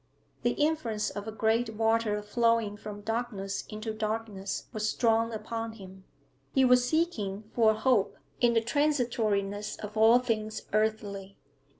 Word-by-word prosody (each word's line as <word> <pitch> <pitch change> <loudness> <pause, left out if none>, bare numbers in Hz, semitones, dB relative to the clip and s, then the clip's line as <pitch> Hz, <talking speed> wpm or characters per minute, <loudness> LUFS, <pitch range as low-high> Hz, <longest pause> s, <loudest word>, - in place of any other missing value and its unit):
The 240 - +1
influence 290 -9 0
of 205 +1 -6
a - - -3
great 220 +1 0
water 225 -1 +1
flowing 230 -1 +1
from 205 0 -8
darkness 210 -3 -3
into 215 +1 -5
darkness 215 -2 -3
was 215 0 -1
strong 230 0 +2
upon 225 0 -4
him; 190 -3 -12 0.5
he 265 -1 +5
was 250 0 +5
seeking 220 - -1
for 225 -2 +4
a 220 - +3
hope 220 -3 +2 0.2
in 240 -1 +3
the 225 - +4
transitoriness 225 -7 0
of 210 0 -8
all 225 +2 +7
things 220 -3 -2
earthly. 205 -2 -1
220 Hz, 140 wpm, -29 LUFS, 210-235 Hz, 0.5 s, all